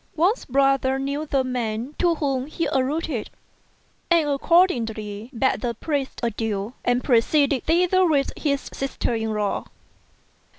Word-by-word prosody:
Wang's 360 +9 +1
brother 270 0 +2
knew 280 +3 -3
the 275 -2 +1
man 245 0 -3
to 345 -2 +3
whom 275 -4 -1
he 325 +2 -2
alluded, 270 -1 -1 0.8
and 335 -3 +4
accord 335 +6 +4
ingly 220 - -5
bade 260 +3 +1
the 235 -2 -2
priest 280 +1 -3
adieu, 225 -1 -2
and 245 +1 +1
proceeded 275 +2 +2
thither 360 +3 +3
with 285 -4 +1
his 280 -2 -1
sister 270 -2 -2
in 225 -1 -1
law. 210 -1 -1
270 Hz, 135 wpm, -23 LUFS, 235-305 Hz, 0.8 s, and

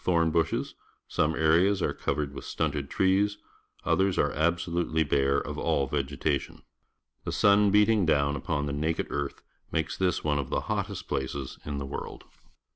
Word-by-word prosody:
(ini(' 85 -2 +2
places 80 -1 0 0.4
II' - - +4
and 80 - -1
I'idges. 85 +5 +3
tlioiii 75 -4 -1
liuslics"; - - -8
stunted 75 -3 -3
lives; 100 +2 +3 0.5
others 95 0 +2
are 75 - +2
absolutely 85 0 0
bare 70 -1 +2
of - - -5
all 70 - +1
vegetation. 70 0 -2 0.6
The - - -3
sun 100 0 +4
beating 105 -2 +4
down 70 -2 +2
upon 70 +1 -2
the 70 - -3
naked 80 +3 -1
earth 70 -1 -3 0.3
makes 80 - -1
this 90 -2 0
one 75 -1 +1
of 65 -3 -4
the - - 0
hottest - - -3
places 65 0 -4
in 75 -1 -3
the 70 - -4
world. 70 +1 -6
80 Hz, 160 wpm, -28 LUFS, 70-90 Hz, 0.6 s, II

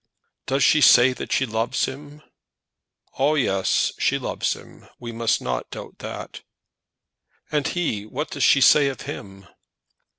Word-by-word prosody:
"Does 135 +1 +1
she 150 - +4
say 125 0 +6
that - - -8
she 135 - +2
loves 115 +2 -1
him?" 145 +2 -10 1.0
"Ah, 145 +3 +3
yes; 95 -9 +1
she - - +1
loves - - -2
him. - - -15
We 120 -1 -8
must 115 0 0
not 60 -1 -3
doubt - - -10
that." - - -8 1.1
"And 150 -2 0
he; 115 - -2
what 150 +8 -5
does 145 - -2
she 135 - +5
say 140 +2 +6
of 135 -2 -5
him?" 95 -1 -9
130 Hz, 145 wpm, -23 LUFS, 110-145 Hz, 1.1 s, say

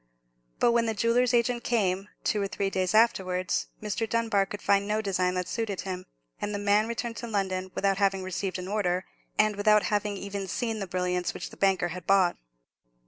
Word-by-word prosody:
But 235 - +4
when 235 -1 +2
the 225 - -1
jeweller's 230 +3 +3
agent 240 0 +1
came, 195 -4 0
two 210 - +1
or 200 - 0
three 195 0 -2
days 185 +1 0
afterwards, 185 -5 +2 0.2
Mr. 215 +2 -2
Dunbar 225 -4 +1
could 205 - -6
find 200 0 +3
no 210 +1 +1
design 185 -3 0
that 180 -1 -2
suited 215 -4 -2
him; 185 -1 -5 0.3
and 205 0 -2
the - - 0
man 205 +2 +3
returned 235 0 -3
to 235 - -5
London 190 -3 -1
without 195 0 +1
having 195 -1 +2
received 185 +1 -3
an 185 0 -6
order, 190 -3 0 0.3
and 215 -1 +3
without 210 +1 +4
having 205 -1 0
even 200 0 -5
seen 225 +3 -2
the 195 - -4
brilliants 180 0 -1
which - - -6
the - - -11
banker 190 -3 +2
had 180 0 -7
bought. 190 -3 +4
200 Hz, 195 wpm, -28 LUFS, 185-220 Hz, 0.3 s, But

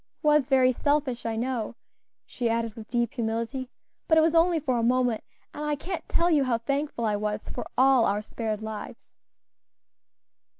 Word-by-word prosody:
It - - -14
was 300 -3 +4
very 260 -2 +4
selfish, 280 -2 0
I 225 - -2
know," 235 -1 -2 0.5
she 240 -2 -2
added 230 -1 -1
with 220 0 -11
deep 240 -1 0
humility; 230 +2 -3 0.4
"but 320 - +4
it - - +7
was 320 +1 +3
only 335 0 +4
for 255 -5 0
a - - 0
moment, 245 -2 +2 0.3
and 295 - -6
I 300 0 0
can't 345 +5 -6
tell 345 +1 +2
you 295 -3 +4
how 250 -3 +1
thankful 275 0 -2
I 210 -1 +1
was 210 0 -3
for - - -5
all 260 -2 +5
our 205 +1 0
spared 220 -1 -4
lives." 220 -1 -7
250 Hz, 180 wpm, -27 LUFS, 225-290 Hz, 0.5 s, it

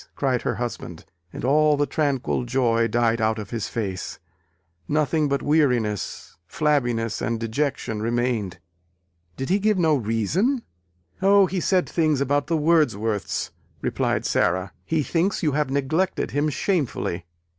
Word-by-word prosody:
cried 130 -3 0
her - - -1
husband: 115 -8 -5 0.3
and - - -5
all 150 +2 +4
the 145 - +2
tranquil 140 -5 0
joy 120 -2 +2
died 115 -1 +1
out 110 0 +1
of 105 -2 -7
his 115 -3 -2
face; 100 -5 -4 0.7
nothing 155 0 +1
but 140 0 0
weariness, 125 - 0
flabbiness 120 - 0
and 115 0 -1
dejection 115 -2 -2
remained. 115 -5 -1 0.8
"Did 135 - -4
he 195 +3 +3
give 210 0 +2
no 160 -3 +3
reason?" 145 - 0 0.6
"O, 200 0 +6
he 185 +1 -2
said 185 +1 +2
things 155 -4 +1
about 145 +1 +1
the 165 0 +1
Wordsworths," 145 - +1 0.3
replied - - -1
Sara. 90 +1 +1
"He 155 - 0
thinks 175 +7 0
you 155 - +2
have 145 -1 0
neglected 140 +7 0
him 145 +2 +1
shamefully. 135 - -1
135 Hz, 140 wpm, -24 LUFS, 115-155 Hz, 0.8 s, O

